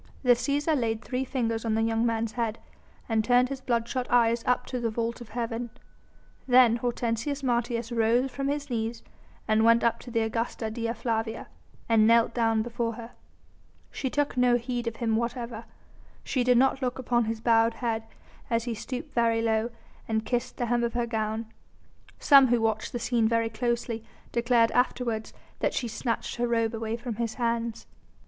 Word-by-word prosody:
The 250 - +5
Cæsar 285 +5 +2
laid 225 -4 -1
three 255 0 -2
fingers 230 -4 -2
on 225 -2 0
the 225 - +1
young 225 +1 +1
man's 225 -1 -1
head, 230 -1 -2 0.5
and 220 -2 +1
turned 250 +2 +3
his 275 -1 -5
bloodshot 240 +1 -1
eyes 235 -1 +3
up 250 0 +2
to 250 - -4
the 235 -1 -1
vault 230 +2 -3
of 235 - -10
heaven. 235 +1 -3 0.8
Then 245 -2 +6
Hortensius 240 +3 -2
Martius 235 -2 -1
rose 235 +3 +2
from 275 +1 -3
his 285 -1 -3
knees 230 0 -2 0.4
and 220 0 +3
went 230 +1 +5
up 235 - +2
to 245 - -10
the 230 -1 0
Augusta 225 0 -2
Dea 230 0 -2
Flavia, 225 -2 -3 0.4
and 220 -2 +4
knelt 230 0 +4
down 225 -2 +2
before 235 0 -2
her. 230 +1 -9 0.8
She 265 - -3
took 290 0 -1
no 250 -1 +4
heed 245 0 -3
of 230 - -2
him 225 -1 0
whatever. 235 -1 -3 0.6
She 255 - 0
did 250 0 +4
not 270 +2 +3
look 250 -1 -1
upon 240 -2 +1
his 225 0 -3
bowed 230 0 +3
head 230 -2 -1 0.5
as 230 -1 +1
he 240 -1 -3
stooped 250 +3 -6
very 230 -1 +2
low 220 0 +1 0.4
and 220 -1 -1
kissed 245 +1 -2
the 245 - -1
hem 240 0 +1
of 235 - -1
her 240 -1 +1
gown; 220 -1 -2 0.7
some 275 -3 +7
who 240 -1 +3
watched 220 -1 -1
the - - -3
scene 235 -1 +1
very 230 0 +1
closely 235 0 -2 0.3
declared 235 -1 +3
afterwards 240 -3 0 0.3
that - - 0
she 245 - -1
snatched 230 +2 -3
her 240 0 0
robe 230 -1 +1
away 225 0 -3
from 235 -2 -5
his 230 -2 -2
hands. 230 -1 -2
235 Hz, 185 wpm, -27 LUFS, 225-245 Hz, 0.8 s, some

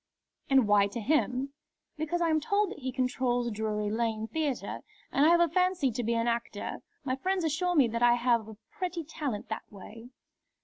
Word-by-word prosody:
"And 265 -5 +5
why 205 -1 +5
to 220 +4 -6
him?" 270 +1 0 0.4
"Because 325 +2 -1
I 335 - +2
am 315 - +3
told 400 +5 +1
that - - -8
he 260 -1 -3
controls 250 -2 0
Drury 210 -1 -2
Lane 220 -1 -1
Theatre, 295 -1 -2 0.3
and 285 +3 +4
I - - +6
have 340 0 +5
a 345 - +5
fancy 360 -4 +1
to 240 +2 -3
be 230 +1 0
an 230 +1 0
actor. 235 0 -3 0.2
My 260 -2 -1
friends 370 +6 -1
assure 350 +3 0
me 275 -6 +5
that 230 +1 -3
I 240 0 +6
have 235 -2 +1
a 220 - -11
pretty 365 -5 -3
talent 285 -8 -4
that 220 - -6
way." 220 +4 -11
255 Hz, 195 wpm, -29 LUFS, 230-315 Hz, 0.4 s, I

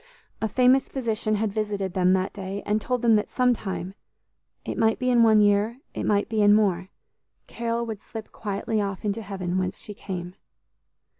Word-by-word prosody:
A 220 - +1
famous 255 +4 +3
physician 225 -4 -1
had 210 -1 -1
visited 205 -3 -2
them 185 0 +3
that 190 0 0
day, 195 0 -5
and 210 +1 0
told 250 +2 -2
them 230 -2 +5
that 210 - -2
sometime, 215 -7 -1 0.7
it - - -3
might 220 -1 +2
be 255 0 0
in 240 -1 +5
one 220 -2 +6
year, 205 +4 +2
it - - -3
might 205 -1 +2
be 220 -2 0
in 205 0 +6
more, 190 -4 +1 0.6
Carol 235 0 -2
would 220 -3 -6
slip 220 0 -9
quietly 210 +1 -2
off 200 0 -4
into 210 +2 -1
heaven, 190 -3 -3
whence 185 +1 -2
she 210 - -7
came. 180 -3 -6
210 Hz, 180 wpm, -25 LUFS, 195-225 Hz, 0.7 s, one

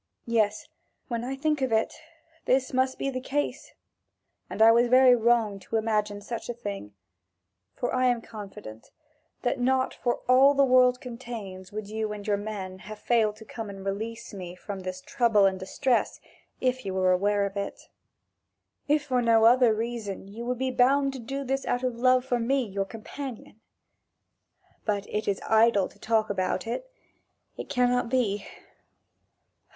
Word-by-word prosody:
Yes, 215 -3 0 0.4
when 235 -1 -2
I 260 +2 -3
think 300 +1 0
of 260 -2 0
it, 220 0 +1 0.5
this 260 0 +1
must 260 0 +1
be 275 - -2
the 255 -1 -4
case, 290 +3 -3 0.8
and - - -6
I 225 +1 +8
was 235 +1 +4
very 255 0 +7
wrong 225 -3 +2
to 195 - -6
imagine 210 -2 0
such 230 +3 -6
a 240 - -3
thing; 200 - -7 0.8
for 245 - -2
I 255 0 +3
am 245 -1 +2
confident 200 - -10 0.5
that 250 +1 0
not 260 +1 +1
for 240 - -2
all 265 +3 +6
the 275 0 +5
world 250 -1 +4
contains 230 -7 -8
would 210 0 -5
you 215 0 -3
and 205 -1 -8
your 210 -2 +2
men 200 -3 -6
have 215 +3 -9
failed 220 -1 +1
to 220 +1 -13
come 225 -1 -7
to 200 - -7
release 220 +4 -5
me 180 -3 -7
from 195 +1 -7
this 185 0 -6
trouble 225 -1 +3
and 190 -1 +1
distress, 240 +6 0 0.4
if 255 0 0
you 190 -2 -4
were 185 -1 +3
aware 200 +2 +2
of 195 0 -5
it. 200 0 -4 1.1
If 295 0 +2
for 255 -4 0
no 225 -1 +4
other 245 0 +6
reason, 220 -3 -4
you 225 +4 -8
would 250 0 -1
be 260 +1 -1
bound 275 +2 +3
to 265 - -6
do 275 +4 -4
this 270 +1 -1
out 245 +1 0
of 255 -1 0
love 255 +1 +3
for 245 -2 0
me, 260 +3 +1
your 195 0 -2
companion. 225 +1 -8 1.2
But 205 -2 -1
it 215 0 -2
is 200 -1 0
idle 220 -3 +4
to - - -22
talk 220 -2 +1
about 185 -2 -1
it 370 - -4 0.7
it - - -8
cannot 245 -1 +1
be. 220 -6 0
230 Hz, 170 wpm, -27 LUFS, 205-255 Hz, 1.2 s, I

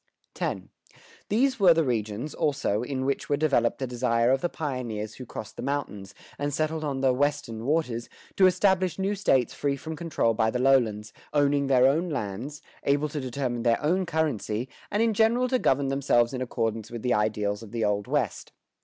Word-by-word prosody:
[122:1] - - -1
X. - - -22 0.6
These 260 +4 +2
were 180 -4 +6
the 165 - +3
regions, 115 +2 -2
also, 135 -8 0
in 130 +1 -3
which 140 0 -2
were 145 - +2
developed 140 -6 +2
the 135 - -2
desire 120 -1 +1
of 135 0 +2
the 175 - 0
pioneers 120 -9 -4
who 125 - -10
crossed 110 - -8
the - - -5
mountains, 130 -9 -4 0.2
and 145 0 -1
settled 155 +2 -1
on 140 -3 -2
the 130 -1 +3
"Western 140 -5 -1
waters," 125 -7 0 0.3
to 190 - +6
establish 185 -1 +2
new 195 +1 0
States 135 - +2
free 140 -1 -1
from 160 +3 -6
control 155 -8 0
by 110 0 +2
the 125 - -1
lowlands, 120 -5 +2 0.2
owning 145 -1 +2
their 130 -2 +5
own 160 +7 +2
lands, 130 +2 -5 0.2
able 145 +2 +1
to 150 0 -4
determine 125 -2 -3
their 115 -1 +2
own 180 +5 +1
currency, 130 -8 -1 0.2
and 210 +3 +1
in 230 -1 +2
general 230 +4 +3
to 255 0 +1
govern 135 - +2
themselves 135 -3 +2
in 130 - -3
accordance 115 -3 -2
with 120 -2 -7
the 125 -1 +2
ideals 105 -1 0
of 110 - -11
the 115 -2 -1
Old 105 +1 0
West. 130 - -2
135 Hz, 195 wpm, -27 LUFS, 115-155 Hz, 0.6 s, were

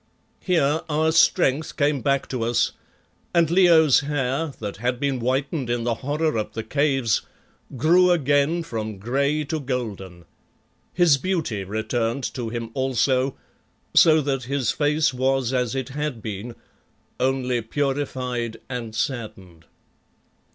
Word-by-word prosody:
Here 160 -4 +1
our 155 +1 +2
strength 160 -2 +2
came 145 -2 +1
back 140 -1 0
to 130 -3 -3
us, 115 +1 +1 0.6
and 165 -2 +3
Leo's 170 -6 +6
hair, 145 +1 -2
that 105 -3 -5
had 120 +3 -1
been 140 -2 -1
whitened 130 +2 -1
in 120 -1 -1
the 120 0 0
horror 145 +2 -1
of 105 - -4
the 110 - -4
Caves, 135 -2 +1 0.6
grew 175 +7 +4
again 150 0 +2
from 110 -8 -5
grey 140 +8 0
to 155 +2 -3
golden. 105 - -5 0.7
His 170 -6 +4
beauty 155 - -2
returned 115 +5 -2
to 120 -4 -4
him 115 0 -5
also, 130 0 +1 0.6
so 160 -1 +6
that 135 -3 -2
his 135 -2 0
face 150 0 +1
was 130 0 0
as 125 -1 0
it 130 -1 -3
had 140 -4 -4
been, 110 +3 -6 0.6
only 125 -2 0
purified 125 -2 -2
and 120 -4 -5
saddened. 95 - -5
135 Hz, 130 wpm, -23 LUFS, 115-150 Hz, 0.7 s, Leo's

